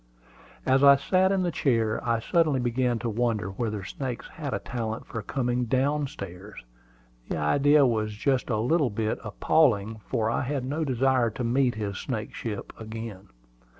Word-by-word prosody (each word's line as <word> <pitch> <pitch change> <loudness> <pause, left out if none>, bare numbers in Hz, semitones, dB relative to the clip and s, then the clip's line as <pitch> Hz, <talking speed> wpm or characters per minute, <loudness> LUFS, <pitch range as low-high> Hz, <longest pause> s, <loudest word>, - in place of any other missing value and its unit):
As 135 +1 +3
I 140 0 +9
sat 185 +7 +2
in 195 -1 +1
the 175 - 0
chair, 115 -7 +1
I 115 -1 +1
suddenly 155 +2 +2
began 125 0 0
to - - +2
wonder 110 -3 -1
whether 105 0 -3
snakes 125 +4 -5
had 145 -4 -6
a - - 0
talent 115 -2 -4
for 115 - -5
coming 125 +1 -1
down 140 +4 +1
stairs. 100 -2 -9 0.7
The - - -1
idea 140 - +4
was 110 -3 0
just 130 +4 0
a 110 - +1
little 135 +5 +2
bit 110 +1 -2
appalling, 110 -1 +2
for 115 -4 0
I - - 0
had 130 0 -2
no 150 +5 -1
desire 130 -3 +2
to 115 +3 -5
meet 125 +1 +2
his 100 -2 -4
snakeship 110 -2 -5
again. 110 -3 -7
120 Hz, 165 wpm, -27 LUFS, 110-135 Hz, 0.7 s, I